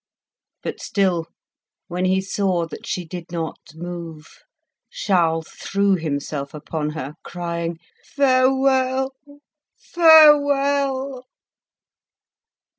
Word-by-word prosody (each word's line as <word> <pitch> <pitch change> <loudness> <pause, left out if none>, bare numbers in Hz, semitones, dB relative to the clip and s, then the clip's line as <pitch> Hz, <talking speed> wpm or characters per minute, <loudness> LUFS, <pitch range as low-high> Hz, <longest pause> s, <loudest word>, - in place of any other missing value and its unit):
But - - -5
still, 180 -5 0 0.6
when 180 +1 -2
he 190 +1 +2
saw 190 -3 -1
that 165 - -10
she 180 - -3
did 170 +1 -8
not 165 -2 -4 0.2
move, 165 -2 -7 0.6
Charles 170 - 0
threw 200 0 0
himself 145 -2 -4
upon 150 0 -4
her, 145 -1 -5
crying 170 -1 -4 0.4
"Farewell! 265 0 +2 0.6
farewell!" 280 -5 +4
185 Hz, 85 wpm, -21 LUFS, 165-265 Hz, 0.6 s, farewell